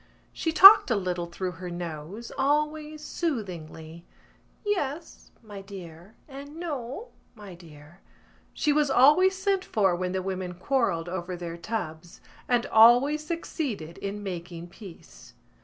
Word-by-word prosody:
She 325 Hz, -, -2 dB
talked 390 Hz, +3 st, +9 dB
a 235 Hz, -, +2 dB
little 180 Hz, -3 st, -2 dB
through 180 Hz, +2 st, -4 dB
her 180 Hz, -, -5 dB
nose, 175 Hz, +5 st, -7 dB
always 300 Hz, +2 st, -1 dB
soothingly: 170 Hz, -, -5 dB, 0.6 s
"Yes, 325 Hz, -6 st, -3 dB
my 205 Hz, -3 st, -9 dB
dear," 190 Hz, 0 st, -12 dB
and 285 Hz, +1 st, -10 dB
"No, 320 Hz, -, -6 dB, 0.3 s
my 205 Hz, -4 st, -11 dB
dear." 160 Hz, -1 st, -16 dB, 0.5 s
She 300 Hz, -, 0 dB
was 300 Hz, -1 st, +2 dB
always 300 Hz, +9 st, +5 dB
sent 385 Hz, 0 st, 0 dB
for 195 Hz, -, +1 dB
when 180 Hz, +1 st, -3 dB
the 185 Hz, 0 st, -3 dB
women 185 Hz, -2 st, -4 dB
quarrelled 185 Hz, -5 st, -1 dB
over 180 Hz, 0 st, -5 dB
their 170 Hz, -1 st, -6 dB
tubs 170 Hz, -4 st, -6 dB, 0.3 s
and 245 Hz, -1 st, +1 dB
always 245 Hz, +7 st, +5 dB
succeeded 280 Hz, -, -5 dB
in 200 Hz, +1 st, -5 dB
making 175 Hz, -2 st, -7 dB
peace. 170 Hz, -, -14 dB
200 Hz, 130 wpm, -26 LUFS, 175-290 Hz, 0.6 s, talked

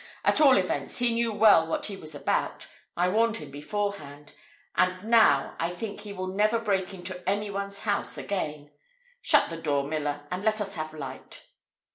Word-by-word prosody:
At -, -, +4 dB
all 275 Hz, -6 st, +7 dB
events, 165 Hz, -7 st, -2 dB
he 240 Hz, -1 st, +3 dB
knew 230 Hz, 0 st, +1 dB
well 205 Hz, -6 st, +6 dB
what -, -, -2 dB
he 205 Hz, -, -5 dB
was 155 Hz, -5 st, -7 dB
about: 145 Hz, -, -1 dB, 0.3 s
I 175 Hz, +1 st, +3 dB
warned 225 Hz, +4 st, +2 dB
him 150 Hz, -2 st, -9 dB
beforehand: 150 Hz, -2 st, -5 dB, 0.4 s
and 185 Hz, +1 st, +1 dB
now 220 Hz, -11 st, +4 dB
I 165 Hz, -, 0 dB
think 200 Hz, +4 st, -6 dB
he 205 Hz, -1 st, -8 dB
will 185 Hz, -2 st, -4 dB
never 210 Hz, +4 st, +2 dB
break 195 Hz, -4 st, -1 dB
into 185 Hz, -1 st, -7 dB
any 205 Hz, +1 st, -1 dB
one's 200 Hz, 0 st, -4 dB
house 205 Hz, -, -1 dB
again. 150 Hz, -7 st, -4 dB, 0.5 s
Shut -, -, +3 dB
the 165 Hz, 0 st, -6 dB
door, 145 Hz, -3 st, +1 dB
miller, 145 Hz, 0 st, -3 dB
and 180 Hz, +2 st, -3 dB
let 215 Hz, 0 st, +2 dB
us 200 Hz, -1 st, -3 dB
have 155 Hz, -2 st, -5 dB
a -, -, -10 dB
light." 135 Hz, -3 st, -8 dB
185 Hz, 185 wpm, -27 LUFS, 155-210 Hz, 0.5 s, all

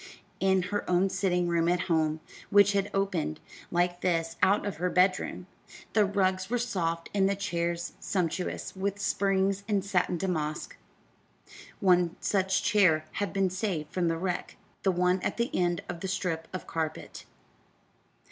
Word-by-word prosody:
In 190 Hz, -1 st, +3 dB
her 205 Hz, -, -2 dB
own 180 Hz, +2 st, +3 dB
sitting 180 Hz, -2 st, +1 dB
room 170 Hz, -1 st, +1 dB
at 175 Hz, 0 st, +2 dB
home 160 Hz, -2 st, 0 dB, 0.3 s
which 205 Hz, 0 st, +6 dB
had 200 Hz, 0 st, 0 dB
opened, 190 Hz, -, -1 dB, 0.3 s
like 175 Hz, 0 st, 0 dB
this, 165 Hz, -2 st, 0 dB
out 200 Hz, +3 st, +3 dB
of 200 Hz, -6 st, -3 dB
her 180 Hz, +2 st, 0 dB
bedroom 185 Hz, +1 st, +1 dB, 0.5 s
the 210 Hz, -2 st, +5 dB
rugs 185 Hz, -1 st, 0 dB
were 245 Hz, -, +1 dB
soft 170 Hz, -9 st, -2 dB
and 195 Hz, -1 st, +3 dB
the 200 Hz, -, +1 dB
chairs 170 Hz, -3 st, -2 dB
sumptuous 180 Hz, -1 st, -2 dB
with 195 Hz, +1 st, -2 dB
springs 195 Hz, -1 st, +1 dB
and 200 Hz, -3 st, 0 dB
satin 180 Hz, -2 st, +1 dB
damask. 155 Hz, -4 st, -2 dB, 1.0 s
One 180 Hz, -3 st, +3 dB
such 190 Hz, -2 st, +1 dB
chair 165 Hz, -7 st, +4 dB, 0.2 s
had 205 Hz, -, -1 dB
been 195 Hz, -2 st, +1 dB
saved 185 Hz, -6 st, -3 dB
from 180 Hz, -2 st, +1 dB
the 165 Hz, 0 st, 0 dB
wreck 180 Hz, +1 st, -3 dB, 0.2 s
the 195 Hz, -, +2 dB
one 180 Hz, +1 st, +2 dB
at -, -, -2 dB
the 235 Hz, +1 st, -1 dB
end 175 Hz, -1 st, +1 dB
of 175 Hz, -1 st, -5 dB
the 190 Hz, -, -4 dB
strip 180 Hz, -4 st, -2 dB
of 185 Hz, -, -6 dB
carpet. 160 Hz, -1 st, -4 dB
185 Hz, 155 wpm, -29 LUFS, 170-195 Hz, 1.0 s, which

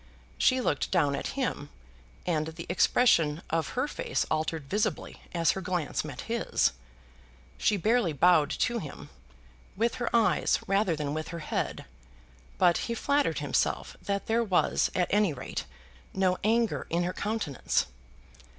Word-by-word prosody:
She 260 Hz, 0 st, +4 dB
looked 145 Hz, -, 0 dB
down 140 Hz, -1 st, +2 dB
at 270 Hz, -, -5 dB
him, 235 Hz, -, -2 dB, 0.6 s
and 155 Hz, -3 st, 0 dB
the 165 Hz, +1 st, -7 dB
expression 170 Hz, -5 st, +3 dB
of 165 Hz, +5 st, -1 dB
her 255 Hz, +3 st, +1 dB
face -, -, -2 dB
altered 155 Hz, 0 st, -1 dB
visibly 205 Hz, +7 st, -2 dB
as 170 Hz, -1 st, +2 dB
her 190 Hz, -, -4 dB
glance 180 Hz, -4 st, -2 dB
met 145 Hz, -4 st, -7 dB
his. 235 Hz, -, +1 dB, 0.9 s
She 210 Hz, -, +2 dB
barely 215 Hz, -1 st, +2 dB
bowed 155 Hz, 0 st, +4 dB
to 240 Hz, -1 st, 0 dB
him, 150 Hz, -8 st, -9 dB, 0.7 s
with 230 Hz, +3 st, +1 dB
her 240 Hz, -, 0 dB
eyes 230 Hz, -3 st, +3 dB
rather 195 Hz, -3 st, +2 dB
than 145 Hz, -1 st, -3 dB
with 155 Hz, 0 st, -3 dB
her 170 Hz, -, -6 dB
head, -, -, -2 dB, 0.7 s
but 175 Hz, -2 st, +4 dB
he 235 Hz, -, -1 dB
flattered 285 Hz, +4 st, +1 dB
himself -, -, 0 dB
that 200 Hz, 0 st, -2 dB
there 230 Hz, +1 st, +2 dB
was, 190 Hz, -5 st, +2 dB
at 180 Hz, -, +3 dB
any 205 Hz, -5 st, +3 dB
rate, 130 Hz, -, -5 dB, 0.5 s
no 185 Hz, -1 st, +2 dB
anger 225 Hz, +2 st, +1 dB
in 170 Hz, +1 st, +1 dB
her 180 Hz, +1 st, -2 dB
countenance. 205 Hz, -, -1 dB
180 Hz, 150 wpm, -29 LUFS, 155-225 Hz, 0.9 s, She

